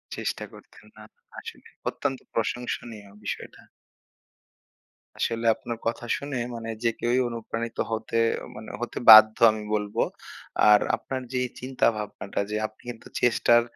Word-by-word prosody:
চেষ্টা - - -3
করতেন। - - -16
না, 110 - -13 0.4
আসলেই। - - -11 0.2
অত্যন্ত 135 -2 -3
প্রশংসনীয় 115 -2 -3
বিষয়টা। - - -6 1.6
আসলে 115 0 -1
আপনার 115 -1 -6
কথা 120 +1 -2
শুনে 140 -1 -6 0.2
মানে 115 0 -6
যে 115 - +4
কেউই 120 +2 +1
অনুপ্রাণিত 115 0 -5
হতে 110 +1 -2 0.3
অ - - -7
মানে 110 +1 -9
হতে 120 - -4
বাধ্য, 110 0 +10
আমি 110 0 -5
বলব। 105 -1 -2 0.7
আর 105 -1 +8 0.2
আপনার 130 -1 -5
যে 125 - +1 0.2
চিন্তা-ভাবনাটা 110 -6 -1
যে - - -1
আপনি 110 - -25
কিন্তু 115 -2 -9
চেষ্টার 120 -1 +4
115 Hz, 130 wpm, -26 LUFS, 110-120 Hz, 1.6 s, বাধ্য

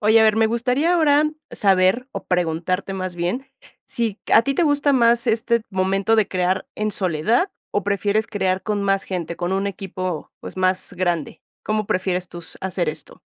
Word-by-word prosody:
Oye, 220 +2 +5
a - - +6
ver, 215 -1 +4
me 225 0 +4
gustaría, 250 +9 +1
ahora, 300 -3 +4 0.3
saber 195 +5 +2
o - - -6
preguntarte, 180 +2 -1
más 185 -2 -4
bien, 185 +11 -2 0.4
si 230 -5 -3
a 225 - +7
ti 275 +3 -1
te 350 - +2
gusta 290 -2 +2
más 235 -2 +3
este 235 +1 +1
momento 195 +2 +1
de 215 -3 +2
crear 185 0 -1
en 215 0 -1
soledad, 195 - +1 0.2
o 205 - 0
prefieres 205 +2 +1
crear 190 -2 -1
con 210 -2 -1
más 195 -1 +1
gente, 170 -3 -4
con 175 +1 -2
un 195 +1 0
equipo, 185 -3 -4
pues, - - -9
más 185 0 0
grande, 175 -4 -2 0.2
¿cómo 215 -1 -1
prefieres 185 -1 -1
tú 175 - -9
s 170 - -11
hacer 185 -3 -1
esto? 155 -1 -4
195 Hz, 185 wpm, -22 LUFS, 185-225 Hz, 0.4 s, a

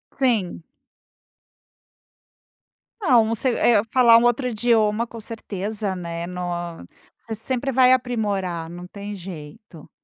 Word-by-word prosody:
Sim. 220 -11 0 2.4
Não, 250 - +5
você, 230 +4 0
eh, 225 -4 +4
falar 235 -3 +7
um 230 - +3
outro 240 +2 +2
idioma, 225 0 +1
com 230 - -10
certeza, 210 -2 -4
né. 170 -1 -5
No 180 0 -6 0.9
você 220 - -4
sempre 260 +4 -2
vai 255 0 +5
aprimorar, 200 -9 -1
não 175 +1 -9
tem 205 +1 -7
jeito. 170 -1 -11
215 Hz, 115 wpm, -22 LUFS, 185-240 Hz, 2.4 s, falar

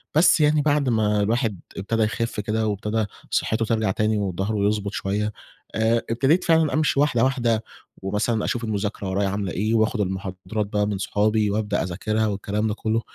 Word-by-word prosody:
بس 165 +1 +5
يعني 150 0 +4
بعد 145 -3 +2
ما 105 -2 +2
الواحد 110 -3 0 0.2
ابتدا 110 +3 0
يخف 115 0 -2
كده، 110 +1 -1
وابتدا 105 +1 -1 0.2
صحته 110 +1 +1
ترجع 110 -3 +1
تاني، 110 +2 +1
وضهره 100 +2 -1
يضبط 105 -1 -1
شوية، 105 +2 -1 0.4
آآ 115 +1 +2
ابتديت 135 +10 +2
فعلًا 160 -2 +3
أمشي 155 -2 +2
واحدة 130 -5 +3
واحدة، 120 -4 +1 0.4
ومثلًا 105 +3 0
أشوف 120 - -2
المذاكرة 105 -2 -2
ورايا 100 +1 0
عاملة 100 -2 -2
إيه، 110 +4 -1
واخد 110 0 +2
المحاضرات 95 +2 -3
بقى 105 0 0
من 105 - -1
صحابي، 105 +1 +1
وابدأ 105 -2 0
أذاكرها 110 +5 -1
والكلام 105 +1 -1
ده 105 - -1
كله، 110 +1 -1
110 Hz, 170 wpm, -23 LUFS, 100-115 Hz, 0.4 s, بس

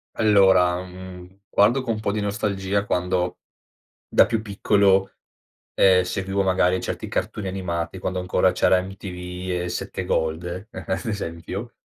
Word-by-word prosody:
Allora, 95 -4 +4
mhmm, 90 0 -11
guardo 120 +7 +4
co' 120 - -1
un 110 - -2
po' 110 -1 -1
di 105 - -2
nostalgia 100 -1 -1
quando 90 -1 -1 0.7
da - - +5
più 115 -2 -1
piccolo, 100 -2 +2 0.6
ehm, 95 -1 +5
seguivo 95 +1 -1
magari 95 -1 +2
certi - - -4
cartoni 100 -2 -3
animati, 90 -2 -3
quando 90 0 -3
ancora 90 +1 +2
c'era 90 - +3
MTV 90 -1 -7
e - - -3
7 - - -4
Gold, 85 +4 -2
ad 95 -2 -4
esempio, 100 +2 -5
95 Hz, 135 wpm, -23 LUFS, 90-100 Hz, 0.7 s, da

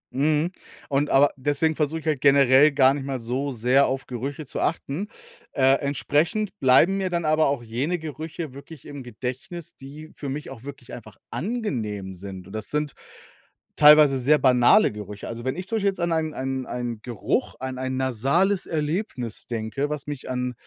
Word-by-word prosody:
Mhm, 155 +4 +1 0.4
und 145 +1 +1
aber 140 +2 +5
deswegen 145 +3 0
versuche 155 +1 -1
ich - - -20
halt 150 -4 0
generell 140 +1 +6
gar 135 -1 +5
nicht 140 -1 -4
mal 135 -2 -3
so 130 +5 -3
sehr 125 +4 +3
auf 135 +1 -3
Gerüche 135 +5 -5
zu 140 - -6
achten. 165 +5 -2 0.5
Äh, 135 0 +4
entsprechend 150 - 0
bleiben 135 +9 +5
mir 190 -1 -1
dann 170 -2 -2
aber 155 0 +3
auch 140 -4 -1
jene 130 +10 -2
Gerüche 160 -1 -6
wirklich 140 +1 -12
im 145 -2 -8
Gedächtnis, 130 +8 -7
die 150 +4 -11
für 140 - -6
mich 145 0 -5
auch 115 -4 -10
wirklich 140 -3 -10
einfach 110 -4 -11
angenehm 115 - -3
sind, 95 0 -9
und 95 - -13
das 110 0 -5
sind 150 -1 -1 0.8
teilweise 150 -2 +7
sehr 150 +5 +4
banale 125 - +5
Gerüche. 105 -1 -8
Also, 120 +1 -7
wenn 130 - -1
ich 185 +1 -6
zum 225 - -1
Beispiel 200 -1 +2
jetzt 195 - -6
an 170 0 0
einen 160 -1 0
einen 130 -1 -3
einen 120 -3 -4
Geruch 120 -4 -2
an 130 0 -5
ein 130 0 -2
nasales 140 - +1
Erlebnis 150 - -3
denke, 120 +5 -3
was 150 -2 -4
mich 145 -3 -6
an 125 0 -2
140 Hz, 185 wpm, -24 LUFS, 125-155 Hz, 0.8 s, teilweise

